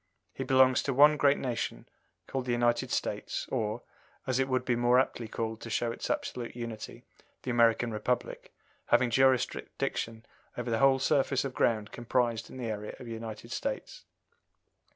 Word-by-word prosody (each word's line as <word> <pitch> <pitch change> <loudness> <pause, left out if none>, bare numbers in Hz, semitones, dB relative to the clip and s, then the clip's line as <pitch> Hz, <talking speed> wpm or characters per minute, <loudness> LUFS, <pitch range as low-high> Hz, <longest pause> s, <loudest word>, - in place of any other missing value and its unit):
He 135 - -4
belongs 130 -1 +5
to 135 - -2
one 150 +3 +7
great 145 -1 +4
nation 120 -3 -3 0.4
called 130 -2 -3
the - - 0
United 120 0 +1
States, - - -2
or, 110 +2 -2 0.4
as 130 -1 0
it 135 - +2
would 130 -1 0
be 125 - +2
more 120 +1 +4
aptly 120 -3 -1
called 110 0 -4
to 115 - -7
show 115 +1 0
its - - -5
absolute 120 -2 -3
unity, 115 -3 -7 0.4
the 130 - -2
American 115 0 +3
Republic, 110 +3 -2 0.4
having 125 -2 +3
jurisdiction 120 -3 0 0.3
over 120 -1 -3
the 110 - +1
whole 135 -1 +5
surface 135 -1 +1
of 135 - -4
ground 110 -4 +1
comprised 120 -1 -1
in - - -10
the 125 - -4
area 105 -1 -4
of - - -10
the 115 - -7
United 110 -1 -7
States. - - -4
120 Hz, 170 wpm, -30 LUFS, 115-130 Hz, 0.4 s, one